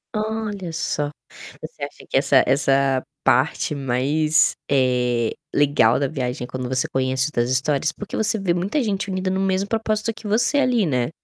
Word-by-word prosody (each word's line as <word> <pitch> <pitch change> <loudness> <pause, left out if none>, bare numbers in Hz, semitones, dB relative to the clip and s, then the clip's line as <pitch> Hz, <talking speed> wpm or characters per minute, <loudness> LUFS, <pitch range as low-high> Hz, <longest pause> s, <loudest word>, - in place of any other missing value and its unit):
Olha 215 -4 -3
só. 150 -2 -2 0.5
Você 155 -2 -9
acha 140 - -8
que - - +1
essa 135 -1 +4
essa 135 -1 +2 0.2
parte 150 - +1
mais, 140 +4 +2 0.2
eh, 125 -3 +1 0.2
legal 135 -4 +3
da 140 - 0
viagem 125 -4 -4
é - - -12
quando 130 -1 -5
você 130 -1 +1
conhece 130 +1 0
as 120 0 +1
histórias 140 +4 +1
porque 210 +4 -8
você 220 0 +2
vê 185 -3 0
muita 195 - -1
gente 205 -4 -2
unida 185 0 -2
no 190 +1 -1
mesmo 195 0 0
propósito 220 0 -1
que 225 0 -14
você 235 +7 +3
ali, 245 -7 +2
né. 125 -5 0
150 Hz, 170 wpm, -22 LUFS, 130-200 Hz, 0.5 s, essa